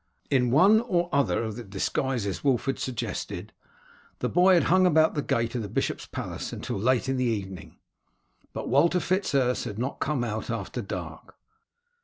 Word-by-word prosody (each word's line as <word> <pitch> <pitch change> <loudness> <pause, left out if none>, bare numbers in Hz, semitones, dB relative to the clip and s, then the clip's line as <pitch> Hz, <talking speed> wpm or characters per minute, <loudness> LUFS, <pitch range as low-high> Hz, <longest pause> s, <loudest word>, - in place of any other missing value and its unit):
In 125 -3 +3
one 195 - +6
or 175 -7 0
other 140 -4 +2
of 110 -2 -4
the 120 - -6
disguises 105 +2 -2
Wulf 135 -4 +2
had 135 - -1
suggested, 125 -3 -4 0.6
the - - -2
boy 180 +2 +5
had 170 - +4
hung 185 +1 +4
about 160 -2 +4
the 145 - -1
gate 115 -4 -1
of 125 - -2
the 105 - -5
bishop's - - -2
palace - - -5
until - - -4
late 130 +4 +2
in 135 0 0
the 125 - +1
evening, 100 -5 -4 0.7
but - - -5
Walter 165 +8 +3
Fitz 185 -1 -1
Urse 125 -2 +1
had 105 -4 -5
not 125 +4 -3
come 140 -4 -1
out 110 -2 -4
after - - -3
dark. - - -7
130 Hz, 180 wpm, -27 LUFS, 115-160 Hz, 0.7 s, one